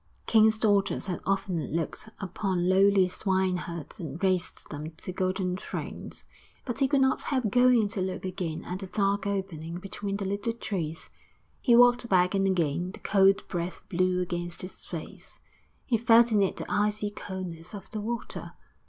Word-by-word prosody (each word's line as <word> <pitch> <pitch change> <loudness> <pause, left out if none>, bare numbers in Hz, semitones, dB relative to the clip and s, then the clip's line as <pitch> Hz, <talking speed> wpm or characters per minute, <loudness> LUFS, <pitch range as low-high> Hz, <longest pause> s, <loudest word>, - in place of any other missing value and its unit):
Kings' 220 -1 +5
daughters 205 -3 +2
had 185 -3 -3
often 195 -4 0
looked 170 +6 -3
upon 185 -2 -1
lowly 195 0 +5
swineherds 180 -3 -2
and 160 -3 -5
raised 185 -2 0
them 155 +2 -6
to - - -6
golden 185 0 -1
thrones. - - -7 0.4
But 245 -1 -3
he 270 - +4
could 275 0 +2
not 265 0 +3
help 255 -7 -1
going 245 -2 +5
to 200 - -3
look 185 0 -3
again 180 -4 -4
at 180 +1 -4
the 195 - -6
dark 200 0 0
opening 180 -5 -3
between 195 +2 -4
the 200 - -3
little 200 +4 -1
trees. 170 -8 -4 0.5
He 240 -4 +5
walked 245 0 +5
back 180 0 +4
and 195 0 +2
again 175 0 0
the - - -10
cold 195 -1 +3
breath 175 -1 -4
blew 185 +1 +1
against 175 -1 -3
his 185 - -6
face; - - -8 0.5
he 230 -4 +1
felt 235 +1 +6
in 210 -2 +4
it 195 - +1
the - - -5
icy 210 0 0
coldness 185 -3 -7
of 195 - -10
the 215 -2 -3
water. 235 +2 -4
195 Hz, 170 wpm, -28 LUFS, 180-210 Hz, 0.5 s, felt